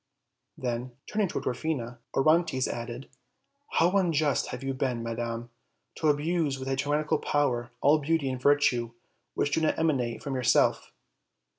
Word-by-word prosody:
Then, 125 0 -3
turning 210 -2 0
to - - -3
Dwarfina, 125 -3 -3 0.2
Orontes 155 -2 +3
added: 120 +2 -5 0.7
"How 170 +2 +4
unjust 155 -5 +1
have - - -6
you 135 0 -1
been, 130 -3 -1
madam, 115 0 -4 0.4
to 160 - -1
abuse 150 -1 +1
with 130 0 -6
a 135 - +1
tyrannical 145 +2 0
power 125 -5 0
all 150 +3 +5
beauty 155 0 0
and 130 -1 -3
virtue 125 -5 +3 0.4
which 145 - 0
do 160 - +2
not 155 - +1
emanate 135 -8 0
from 140 - -3
yourself!" 125 -2 +2
135 Hz, 145 wpm, -28 LUFS, 120-155 Hz, 0.7 s, all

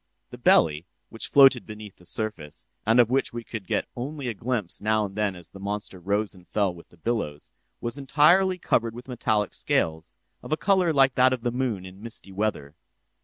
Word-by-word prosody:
The - - -10
belly, 80 +2 +4 0.2
which 115 - -5
floated 135 -3 +6
beneath 105 -2 -10
the 90 - -13
surface, 105 -10 -5 0.2
and 115 +2 +5
of 120 -1 +5
which 135 -2 +1
we 120 0 -5
could 110 -5 -7
get - - -1
only 135 +2 -5
a - - -2
glimpse 115 -4 -2
now 110 0 +2
and 95 - -7
then 105 -3 0
as 85 -1 -7
the 95 - -11
monster 100 -1 -4
rose 100 +3 -1
and 90 -2 -17
fell 100 -4 0
with 85 -1 -15
the 90 - -21
billows, 85 -8 -3 0.3
was 120 +4 -3
entirely 175 +7 +4
covered 115 -9 0
with 120 +2 -10
metallic 110 -4 0
scales, 80 +1 -1 0.2
of - - -10
a 155 - +2
color 190 -3 +3
like 135 -3 +4
that 130 +1 +4
of 125 -2 -4
the 120 - 0
moon 120 -7 -2
in 95 +2 -12
misty 110 -3 -6
weather. 95 -8 -2
110 Hz, 205 wpm, -26 LUFS, 95-125 Hz, 0.3 s, floated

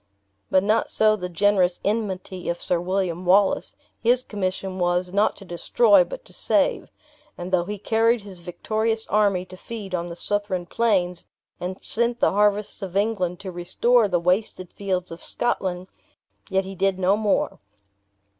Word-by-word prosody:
But 185 - +3
not 215 +2 +1
so 215 0 +3
the 180 -3 -5
generous 185 0 +2
enmity 195 -4 -2
of 170 - -2
Sir 175 - 0
William 185 -1 -1
Wallace. 190 +2 +3 0.3
His 245 +2 +3
commission 190 -2 -3
was, 180 +1 0
not 205 +2 +2
to 200 - -12
destroy, 205 +7 +4
but - - -9
to - - -12
save; - - +1 0.5
and 175 +1 -6
though 175 -2 +2
he 205 +2 -4
carried 225 +3 +2
his 195 -3 -10
victorious 220 +6 -2
army 200 -3 +2
to 185 - -11
feed 205 -1 -8
on 175 -1 -1
the 170 - -7
Southron 205 -2 -1
plains, 180 -5 0 0.3
and 185 +1 -5
sent 235 +1 0
the - - +3
harvests 210 +1 +1
of 190 -1 -4
England 190 -5 0
to 190 -2 -6
restore 210 +7 +2
the 180 -3 +1
wasted 180 +1 -1
fields 185 -3 -3
of 165 - -8
Scotland, 185 -6 -2 0.6
yet 190 -1 +1
he 195 - -7
did 195 0 0
no 190 +1 +3
more. 210 -2 0
195 Hz, 165 wpm, -24 LUFS, 180-215 Hz, 0.6 s, destroy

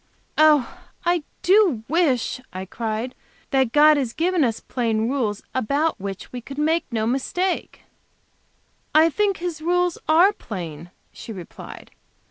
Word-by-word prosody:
"Oh, 310 +1 +4 0.3
I 345 -1 +2 0.2
do 365 - +4
wish," 270 -6 +1
I 185 +1 -6
cried, 225 +4 -4 0.4
"that 265 -4 +2
God 300 +2 +6
had 255 -5 -2
given 345 0 +2
us 230 -4 0
plain 225 -3 -1
rules, 235 -6 -1
about 280 +6 0
which 195 -1 -6
we 245 - -5
could 275 +4 -10
make 315 0 0
no 220 -2 0
mistake!" 310 +10 -2 1.1
"I 320 +1 +6
think 405 +2 +1
His 340 -3 -4
rules 355 +1 +1
are 350 +6 +6
plain," 170 - -7 0.2
she - - -9
replied. 185 -5 -10
275 Hz, 135 wpm, -23 LUFS, 225-335 Hz, 1.1 s, God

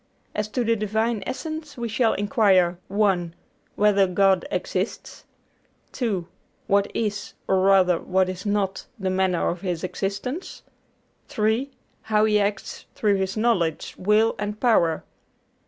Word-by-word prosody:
As 210 0 -2
to 245 +3 -1
the 230 0 +2
Divine 220 +1 -1
Essence 310 0 -5
we 235 -1 -3
shall 225 +1 +2
inquire 195 -5 +3
(1) 190 -4 +1 0.4
whether 200 -2 +4
God 190 0 +2
exists; 185 +2 -4 0.7
(2) 200 -9 -2 0.4
what 200 0 +2
is, 205 -3 -2
or 190 - +3
rather 185 -2 +4
what 190 0 +1
is 185 0 -5
not, 205 -2 -1
the 190 -3 -2
manner 185 -2 +1
of 175 - -4
His 180 -4 -3
existence; 200 - -4 0.6
(3) 220 +5 0 0.3
how 215 -1 +2
He 210 -1 +3
acts 200 -1 -3
through 205 -2 +2
His 190 +2 -2
knowledge, 190 -9 0
will, 210 +4 +3
and 210 0 -4
power. 170 -10 +2
200 Hz, 135 wpm, -24 LUFS, 185-220 Hz, 0.7 s, whether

